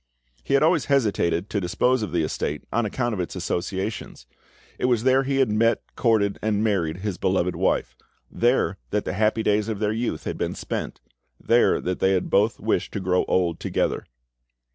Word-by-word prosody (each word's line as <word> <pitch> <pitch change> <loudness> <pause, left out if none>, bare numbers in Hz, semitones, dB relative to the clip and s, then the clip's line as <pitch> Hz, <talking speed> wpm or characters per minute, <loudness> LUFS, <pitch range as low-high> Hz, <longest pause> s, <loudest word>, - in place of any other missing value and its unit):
He 105 - +1
had 140 - +4
always 160 -2 +3
hesitated 105 -9 +1
to 100 - 0
dispose 125 +8 +1
of 105 -6 -3
the 85 -1 +1
estate 75 -1 -3
on 115 -1 +1
account 120 +2 -2
of 100 - -4
its 90 - -4
associations; 95 - -4 0.5
it - - 0
was 120 -3 +2
there 130 +1 +4
he 135 0 -1
had 135 -5 +3
met, 115 +2 +2
courted, 110 -4 +1
and 105 -1 0
married 90 -5 0
his 100 -4 -3
beloved 90 -1 +1
wife; - - 0 0.4
there 120 -5 +1
that 105 0 -1
the - - -2
happy 110 +2 +1
days 105 0 +1
of 110 -2 -2
their 105 0 0
youth 115 +2 -2
had - - -4
been - - -2
spent; - - -5 0.4
there - - +3
that 90 0 -3
they 95 -1 +3
both 105 +5 +1
wished - - -1
to - - -2
grow 90 -1 +1
old 85 -3 +1
together. - - -1
105 Hz, 185 wpm, -24 LUFS, 95-115 Hz, 0.5 s, had